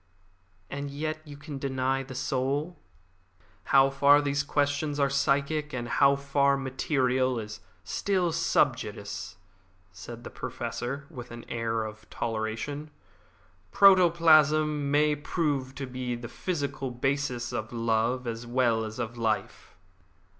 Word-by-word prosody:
"And 140 +3 -5
yet 155 +2 -3
you 145 -1 -10
can 145 -1 -7
deny 135 -1 0
the 135 0 -9
soul?" 135 +6 -1 0.9
"How 135 0 +5
far 140 +1 +6
these 140 -1 0
questions 145 +1 0
are 140 -1 +2
psychic 140 +2 +1
and 120 -1 -3
how 140 +3 +4
far 140 0 +2
material 130 -1 0
is 110 -1 -6 0.2
still 185 -4 0
sub 165 -5 +3
judice," 100 -3 -7 0.5
said 120 +6 -10
the - - -8
Professor, 135 +4 -5
with 125 -5 -8
an 120 0 -9
air 115 -1 -1
of 110 -1 -9
toleration. 115 +7 -3 0.8
"Protoplasm 155 -6 +5
may 150 +1 +3
prove 145 -3 -2
to 140 - -4
be 125 -1 -4
the 120 0 -7
physical 140 -4 -3
basis 125 -1 -2
of 110 - -4
love 115 +2 0
as 115 0 -5
well 120 -2 +2
as 110 0 -6
of 120 0 -4
life." 110 -2 -2
135 Hz, 130 wpm, -28 LUFS, 120-145 Hz, 0.9 s, far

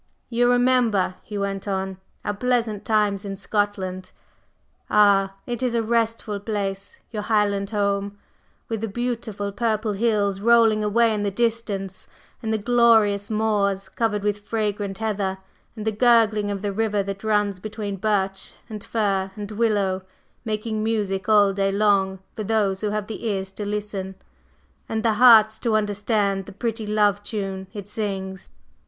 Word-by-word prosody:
"You 245 0 +2
remember," 245 -6 +3
he 210 - -7
went 200 0 -3
on, 190 -1 -2 0.3
"our 205 - 0
pleasant 230 -2 0
times 210 -2 +1
in 195 -1 -5
Scotland? 190 -2 -2 0.8
Ah, 195 -2 +4
it 240 -1 -4
is 250 -2 0
a 230 - +1
restful 225 -2 0
place, 200 -2 -4
your 215 -2 -3
Highland 205 -2 +1
home, 200 -1 -1 0.5
with 225 -2 -3
the 225 - -1
beautiful 220 -2 -3
purple 220 -1 -1
hills 200 -2 +1
rolling 225 -1 +4
away 225 +2 +3
in 210 - -1
the 205 - 0
distance, 205 -3 -2 0.3
and 220 -2 -2
the 220 - +2
glorious 220 -3 +3
moors 205 -3 0
covered 210 -3 -1
with 205 0 0
fragrant 205 -2 -2
heather, 200 -3 -2 0.4
and 215 -2 -6
the 220 - +2
gurgling 220 -2 +3
of 200 0 -4
the 205 -1 -1
river 210 -1 0
that 195 +1 -6
runs 210 -3 +1
between 210 -1 -5
birch 195 -1 -1
and 215 -3 -7
fir 195 -4 0
and 205 -1 -6
willow, 205 -4 +1 0.4
making 215 0 -2
music 210 -3 -1
all 205 -2 +5
day 195 0 +1
long 195 -2 +2 0.2
for 215 - -4
those 205 -3 0
who 210 - 0
have 210 0 -2
the 225 +2 -5
ears 195 -2 -2
to 205 +1 -5
listen, 205 -2 -4 0.7
and 220 -1 -2
the 225 -2 +3
hearts 220 -3 +7
to 230 -3 +1
understand 205 -2 0
the - - -8
pretty 220 +1 -3
love 205 -1 +2
tune 195 -3 -4
it 205 -1 -8
sings! 195 -3 -4
210 Hz, 155 wpm, -23 LUFS, 200-220 Hz, 0.8 s, hearts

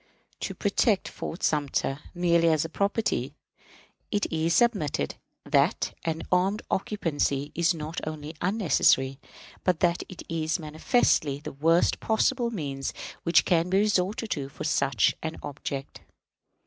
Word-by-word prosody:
To - - -4
protect 205 0 +1
Fort 170 - -6
Sumter, 145 -2 0 0.2
merely 170 -1 +3
as 160 -1 +2
property, 200 +3 0 0.7
it 205 -1 0
is 165 +1 +1
submitted 185 - +1 0.3
that - - +2
an 165 0 -2
armed 190 +3 +2
occupancy 150 -8 -1
is 170 +1 +2
not 155 +1 -5
only 155 0 -5
unnecessary, 155 -8 +2 0.4
but 180 -3 +2
that 175 -1 +2
it 185 - -9
is 160 0 -1
manifestly 155 - +1
the 150 - -7
worst 165 +5 +3
possible 235 +2 +1
means 140 - -4 0.3
which 170 - +4
can 170 0 +2
be 190 - +3
resorted 210 +2 +1
to 140 -3 -2
for 140 - -8
such 140 -3 +2
an 160 0 -4
object. 140 -1 -6
165 Hz, 130 wpm, -27 LUFS, 150-190 Hz, 0.7 s, which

